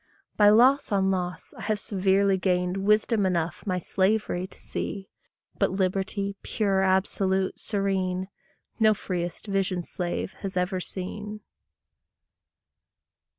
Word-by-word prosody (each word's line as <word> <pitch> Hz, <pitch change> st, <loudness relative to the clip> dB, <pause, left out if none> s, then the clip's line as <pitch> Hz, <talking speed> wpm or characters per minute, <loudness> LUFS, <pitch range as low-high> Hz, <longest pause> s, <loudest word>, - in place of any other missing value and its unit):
By 205 Hz, -1 st, +6 dB
loss 250 Hz, +5 st, +5 dB
on 195 Hz, -1 st, +2 dB
loss 180 Hz, -2 st, -3 dB
I -, -, -11 dB
have 215 Hz, -1 st, -1 dB
severely 195 Hz, -1 st, +2 dB
gained 180 Hz, -1 st, 0 dB
Wisdom 215 Hz, +1 st, +3 dB
enough 175 Hz, 0 st, -1 dB
my 185 Hz, -1 st, +1 dB
slavery 190 Hz, 0 st, 0 dB
to -, -, -17 dB
see; 195 Hz, -1 st, -5 dB, 0.5 s
But -, -, +2 dB
liberty, 195 Hz, +1 st, -1 dB
pure, 195 Hz, -3 st, 0 dB
absolute, 190 Hz, 0 st, +1 dB
serene, 190 Hz, -2 st, -1 dB, 0.5 s
No 215 Hz, -1 st, +5 dB
freëst 175 Hz, -2 st, -4 dB
visioned 190 Hz, -3 st, -1 dB
slave 175 Hz, +2 st, -3 dB
has 195 Hz, -2 st, -4 dB
ever 180 Hz, +1 st, 0 dB
seen. 210 Hz, +4 st, -6 dB
190 Hz, 115 wpm, -26 LUFS, 185-205 Hz, 0.5 s, By